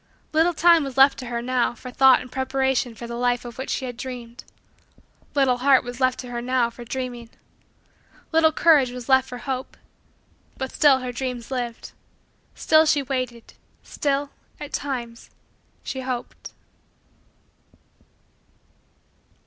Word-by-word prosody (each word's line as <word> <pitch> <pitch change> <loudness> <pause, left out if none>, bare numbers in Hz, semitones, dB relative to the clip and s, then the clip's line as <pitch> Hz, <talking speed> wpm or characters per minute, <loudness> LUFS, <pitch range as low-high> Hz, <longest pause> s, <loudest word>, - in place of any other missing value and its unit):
Little 325 +2 +3
time 335 -1 +5
was 270 -2 -6
left 270 +1 +6
to 255 - -7
her, 235 -1 -3
now, 250 -1 0
for 250 +2 -10
thought 265 0 +5
and 255 -1 -11
preparation 265 -2 -1
for 235 - -8
the 235 - -7
life 245 0 0
of 240 +1 -9
which 265 - -5
she 265 - -2
had 245 -2 -7
dreamed. 245 -1 -8 0.9
Little 260 -3 +2
heart 265 0 +4
was 245 0 -8
left 255 -1 +2
to 250 - -10
her, 240 0 -3
now, 245 -1 +1
for 240 - -11
dreaming. 245 -1 -5 1.0
Little 320 -1 +4
courage 305 -5 +4
was 245 -1 -8
left 265 -1 +3
for 250 - -6
hope. 260 +1 -5 0.8
But 265 -1 -4
still 275 -3 +4
her 250 -1 -4
dreams 250 0 -5
lived. 240 -3 -4 0.6
Still 315 0 +4
she 295 -2 +2
waited. 255 -3 -4 0.3
Still, 280 0 -2 0.3
at 295 - -8
times, 240 -5 -5 0.5
she 265 - -5
hoped. 255 -2 -6
255 Hz, 145 wpm, -23 LUFS, 245-270 Hz, 1.0 s, left